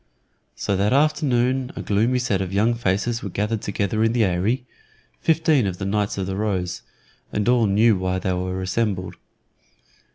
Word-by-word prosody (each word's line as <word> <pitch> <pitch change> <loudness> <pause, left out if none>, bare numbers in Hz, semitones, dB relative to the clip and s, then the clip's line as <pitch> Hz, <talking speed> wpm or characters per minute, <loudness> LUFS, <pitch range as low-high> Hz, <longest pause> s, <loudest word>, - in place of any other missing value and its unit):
So 100 - -1
that 100 +4 +2
afternoon 130 -3 +1
a - - -5
gloomy 110 +5 +1
set 115 -6 0
of 95 -1 -3
young 105 +4 +2
faces 115 +1 -1
were 100 - -5
gathered 105 +3 -2
together 100 +2 -1
in 115 0 +2
the 120 -2 +3
Eyry 100 +8 0 0.5
fifteen 155 -7 +2
of 90 -2 -3
the 95 - -4
Knights 100 +1 -1
of 95 - -1
the 95 0 -3
Rose 95 -4 -2 0.5
and 105 +1 -1
all 120 -3 +4
knew 105 +3 +4
why 95 0 -1
they 95 0 -1
were 90 +1 -3
assembled. 95 -1 -1
105 Hz, 170 wpm, -23 LUFS, 95-120 Hz, 0.5 s, all